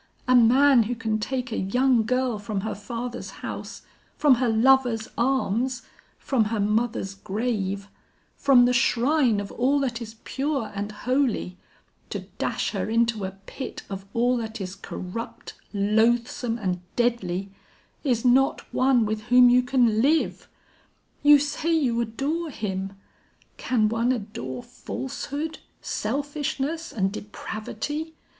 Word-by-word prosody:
A 255 - +5
man 250 +2 +6
who 245 - -1
can 220 -3 -1
take 255 +2 -3
a - - -2
young 245 +4 +2
girl 250 -3 0
from 205 -1 -3
her 220 - -3
father's 235 +4 -5 0.2
house, - - -6 0.3
from 290 -3 +5
her 250 - +2
lover's 235 0 +3
arms, 250 0 0 0.3
from 245 -5 +1
her 220 0 -2
mother's 210 -1 0
grave, 200 -1 -2 0.5
from 260 -3 +5
the 250 - +3
shrine 250 -1 +3
of 200 -1 -5
all 265 +4 +2
that 245 -3 -2
is 220 -1 -7
pure 275 -4 -2
and 205 +1 -4
holy, 240 -5 -1 0.5
to - - -4 0.2
dash - - -1
her - - -2
into 230 -2 +1
a 190 - -4
pit 265 - -7
of 195 0 -5
all 245 +2 +3
that 225 -1 -5
is 185 -1 -5
corrupt, 195 +3 -7 0.2
loathsome 225 +3 +1
and 185 -5 -2
deadly, 200 -6 0 0.5
is 250 -5 0
not 260 +2 +4
one 255 -3 +3
with 215 0 -3
whom 245 0 +7
you 250 +1 +6
can 245 -4 +2
live. 305 +5 +1 0.7
You 290 0 +8
say 295 +3 -1
you 245 -7 +1
adore 280 +9 -2
him: 195 -6 -4 0.6
can 225 -4 +1
one 230 +3 +1
adore 165 - -4
falsehood, 290 +4 -5 0.2
selfishness 290 +5 -3
and 195 -3 0
depravity? 220 +9 -5
235 Hz, 135 wpm, -25 LUFS, 215-265 Hz, 0.7 s, You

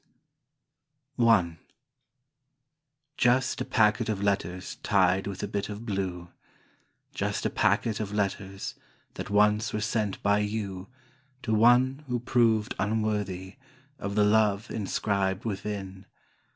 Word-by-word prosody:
I 95 -9 +4 1.6
Just 125 +1 +2
a - - -1
packet 110 0 +2
of 105 -3 -1
letters 95 -2 -2
tied 95 -1 +2
with 100 -1 -5
a - - -1
bit 100 0 -3
of 105 +2 -7
blue, 95 -4 -3 0.8
Just - - -2
a - - +1
packet 110 -3 +1
of 105 -2 -3
letters 100 -1 -3 0.4
that - - -6
once 105 +1 +3
were 105 - -1
sent 105 -1 -1
by 100 0 +3
you 100 -3 -3 0.6
To 110 - -1
one 125 +5 +4
who 125 -1 -1
proved 115 -3 +2
unworthy 105 -2 -2 0.4
Of 100 0 -4
the 105 - +4
Love 105 0 +2
inscribed 100 -1 -1
within. 95 -2 -5
105 Hz, 120 wpm, -28 LUFS, 95-110 Hz, 1.6 s, I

